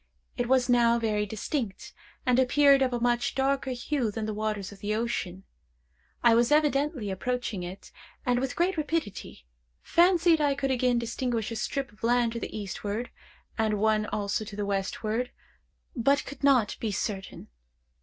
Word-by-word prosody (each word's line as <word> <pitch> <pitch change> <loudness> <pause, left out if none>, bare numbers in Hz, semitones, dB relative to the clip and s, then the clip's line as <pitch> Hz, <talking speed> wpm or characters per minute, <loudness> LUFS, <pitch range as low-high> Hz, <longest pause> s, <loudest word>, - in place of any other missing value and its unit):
It 245 0 -2
was 260 -1 +3
now 235 -1 +4
very 210 -2 0
distinct, 220 0 -4 0.3
and 250 0 +3
appeared 275 +1 +5
of 260 -1 +2
a 240 - -1
much 240 0 +1
darker 270 0 0
hue 250 -1 -1
than 215 +1 -4
the 215 - -3
waters 210 -2 -3
of 200 - -13
the 210 +1 -1
ocean. 195 -5 -3 0.8
I 235 -1 +6
was 235 +3 +3
evidently 290 - +2
approaching 235 0 -2
it, 180 +2 -8 0.3
and 245 -1 +2
with 265 0 -2
great 355 +1 +1
rapidity. 300 - -3 0.4
Fancied 340 -2 +4
I 285 -2 +2
could 270 -1 -1
again 250 -1 +2
distinguish 235 -1 -2
a - - -3
strip 265 +4 -3
of 210 - -23
land 240 0 +2
to 235 - -3
the - - -5
eastward, 210 +3 -4 0.5
and 220 -1 +2
one 215 0 +2
also 205 +1 -2
to 205 -1 -9
the 205 0 -2
westward, 215 +4 -2 0.7
but 275 +3 +2
could 280 -1 -10
not 260 -7 +3
be 220 - -2
certain. 195 -1 -4
235 Hz, 165 wpm, -28 LUFS, 210-265 Hz, 0.8 s, I